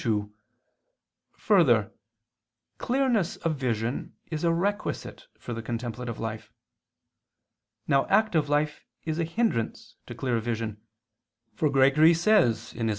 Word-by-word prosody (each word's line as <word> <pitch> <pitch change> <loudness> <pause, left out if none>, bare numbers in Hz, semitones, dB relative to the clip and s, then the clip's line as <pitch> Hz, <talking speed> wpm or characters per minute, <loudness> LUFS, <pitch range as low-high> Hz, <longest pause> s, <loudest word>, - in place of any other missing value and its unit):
2: 105 -2 -1 1.0
Further, 130 - +3 0.9
clearness 245 -8 +1
of 165 -2 -2
vision 120 -2 -3 0.2
is 155 0 -3
a 170 - +3
requisite 205 - -3
for 120 - -7
the 115 - -4
contemplative 120 0 -5
life. 110 -1 -5 1.4
Now 140 -2 +2
active 175 -10 +2
life 150 +1 0 0.2
is 160 0 -2
a - - +2
hindrance 165 - -2
to - - -8
clear 125 -3 -1
vision; 110 -2 -4 0.7
for 155 - +1
Gregory 140 +4 +5
says 165 - +2
(Hom. 115 -1 -2
140 Hz, 115 wpm, -27 LUFS, 115-170 Hz, 1.4 s, Gregory